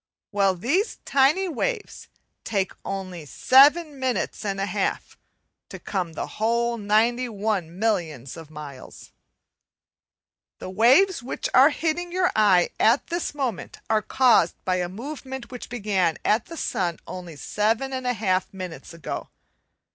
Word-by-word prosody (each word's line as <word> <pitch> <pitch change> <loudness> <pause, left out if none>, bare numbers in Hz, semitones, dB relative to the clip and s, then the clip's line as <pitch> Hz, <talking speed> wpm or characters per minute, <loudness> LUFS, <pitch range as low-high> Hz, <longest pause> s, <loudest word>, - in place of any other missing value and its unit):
Well, 200 -2 +2
these 285 - 0
tiny 285 +8 +3
waves 420 - -3 0.4
take 195 -3 -1
only 185 -4 -5
seven 280 - +4
minutes 255 -5 -2
and 195 -2 -2
a 195 - 0
half 205 -1 -2 0.5
to - - -8
come 180 -5 -3
the - - -3
whole 235 +2 0
91 215 -4 0
millions 165 - -1
of 165 -2 -11
miles. 145 -4 -10 1.5
The 185 - -7
waves 265 - +4
which 245 - -4
are 265 +3 +8
hitting 330 +3 -2
your 360 0 +2
eye 195 -5 +4
at 230 +5 +4
this 345 -3 -2
moment 250 - -3
are 215 -1 +3
caused 245 -9 +3
by 185 0 +1
a 175 -1 -2
movement 265 +3 -7
which 250 - -8
began 195 -8 0
at 215 +1 +2
the 330 - -9
sun 175 - -1
only 175 -3 -8
7 220 - -1
1/2 225 -8 0
minutes 180 -3 -8
ago. 165 -5 -6
220 Hz, 130 wpm, -24 LUFS, 185-265 Hz, 1.5 s, are